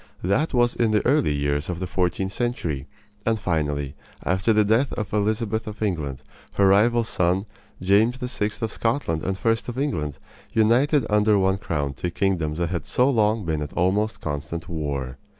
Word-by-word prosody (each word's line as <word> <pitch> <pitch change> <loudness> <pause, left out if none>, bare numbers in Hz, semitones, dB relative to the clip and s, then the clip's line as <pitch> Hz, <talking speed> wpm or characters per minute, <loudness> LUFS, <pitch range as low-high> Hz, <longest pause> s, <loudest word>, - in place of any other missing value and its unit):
That 115 - +1
was 120 -2 +2
in 115 -2 +2
the 105 -1 +1
early 140 - +3
years 70 +1 -1
of 85 -1 -3
the 95 - -2
fourteenth 90 +1 -1
century; 85 - -2 0.4
and 110 -1 +1
finally, 75 -6 -1 0.3
after 95 +5 +2
the 105 -1 +4
death 115 +6 +2
of 105 -3 -4
Elizabeth 110 +1 0
of 105 0 -5
England, 75 -10 -2 0.3
her 100 -1 +4
rival's 115 +4 +4
son, 90 +1 +1 0.4
James 105 +6 +3
VI. 125 -5 -2
of 110 - -1
Scotland 115 - -1
and 95 +3 -2
I. - - +5
of 115 +2 -1
England, 80 - -2 0.4
united 120 +6 +3
under 105 0 +3
one 95 0 +2
crown 70 -6 -2
two 85 +6 -3
kingdoms 85 -5 -1
that 85 -1 -1
had 85 -4 -3
so 125 +3 +3
long 110 -3 +2
been 80 -2 -1
at 75 - -5
almost 105 +4 0
constant 75 +2 -4
war. 70 -5 -4
100 Hz, 175 wpm, -24 LUFS, 80-115 Hz, 0.4 s, I